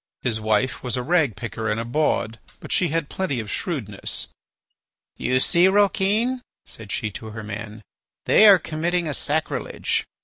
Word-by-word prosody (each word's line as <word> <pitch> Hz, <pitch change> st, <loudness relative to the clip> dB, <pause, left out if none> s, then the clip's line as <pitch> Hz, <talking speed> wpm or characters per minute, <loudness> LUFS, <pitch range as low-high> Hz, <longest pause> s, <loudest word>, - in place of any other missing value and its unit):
His 110 Hz, -3 st, +1 dB
wife 110 Hz, +4 st, +1 dB
was 125 Hz, -1 st, -2 dB
a 125 Hz, -, -2 dB
ragpicker 120 Hz, -, 0 dB
and 105 Hz, +1 st, 0 dB
a 115 Hz, -, -3 dB
bawd, 120 Hz, -4 st, 0 dB, 0.2 s
but -, -, -9 dB
she 180 Hz, -, +3 dB
had 165 Hz, -1 st, -1 dB
plenty 165 Hz, -9 st, -2 dB
of 110 Hz, -2 st, -5 dB
shrewdness. 110 Hz, -, -3 dB, 0.9 s
"You 130 Hz, 0 st, +1 dB
see, 170 Hz, +7 st, +4 dB
Rouquin," 205 Hz, +5 st, +2 dB, 0.2 s
said 110 Hz, -2 st, -8 dB
she 110 Hz, -, -2 dB
to 110 Hz, -, -8 dB
her 110 Hz, 0 st, -7 dB
man, 105 Hz, +1 st, -7 dB, 0.4 s
"they 215 Hz, -, +7 dB
are 200 Hz, -2 st, +9 dB
committing 170 Hz, +1 st, -1 dB
a 150 Hz, -, -2 dB
sacrilege. 150 Hz, +3 st, -1 dB
130 Hz, 160 wpm, -23 LUFS, 110-175 Hz, 0.9 s, are